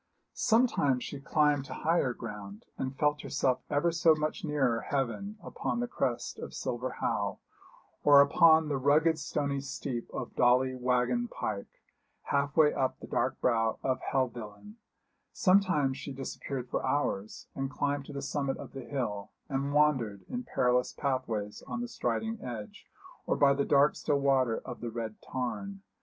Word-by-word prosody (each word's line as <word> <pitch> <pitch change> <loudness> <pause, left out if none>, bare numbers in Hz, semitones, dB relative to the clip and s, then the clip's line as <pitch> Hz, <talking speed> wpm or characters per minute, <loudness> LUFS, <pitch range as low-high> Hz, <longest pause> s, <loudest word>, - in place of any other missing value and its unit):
Sometimes 180 - +2
she 145 - -6
climbed 145 0 +2
to - - -7
higher 160 -5 +1
ground, 105 -3 -8
and 130 0 -4
felt 150 0 +1
herself 130 -1 0
ever 160 +4 +2
so 165 -1 +4
much 155 +6 -3
nearer 135 -7 +1
heaven 145 - -2
upon - - -3
the 245 - -1
crest 120 - -2
of - - -7
Silver 125 +2 -3
Howe, - - -1 0.7
or 145 -1 +8
upon 160 +2 +6
the 140 -2 -1
rugged 155 +4 +3
stony 140 -1 -2
steep 130 -3 -5
of - - -6
Dolly 125 +1 +4
Waggon 125 - +1
pike, 100 - -5 0.4
half 140 +1 -1
way 150 -2 +6
up 130 -1 -1
the - - -8
dark - - -1
brow 115 -2 +2
of 130 -1 0
Helvellyn; 125 - -3 0.6
sometimes 180 -9 +3
she 140 - -6
disappeared 135 -1 -5
for - - -2
hours, 110 -8 -1
and 135 0 -3
climbed 145 0 -1
to 145 - -9
the 140 0 -5
summit 135 0 -1
of - - -9
the 135 -2 -7
hill, 115 -7 -3 0.2
and 140 0 -1
wandered 130 -9 +2
in 245 0 -4
perilous 125 - +1
pathways 120 -7 -2
on 240 +1 -3
Striding 225 -2 -2
Edge, 115 -4 -7 0.4
or - - +2
by 140 -1 +5
the 140 0 0
dark 145 +1 +4
still 145 -2 0
water 130 -4 +2
of 125 - -7
the 120 - -3
Red 115 -1 -5
Tarn. 195 +10 -4
140 Hz, 160 wpm, -30 LUFS, 125-150 Hz, 0.7 s, or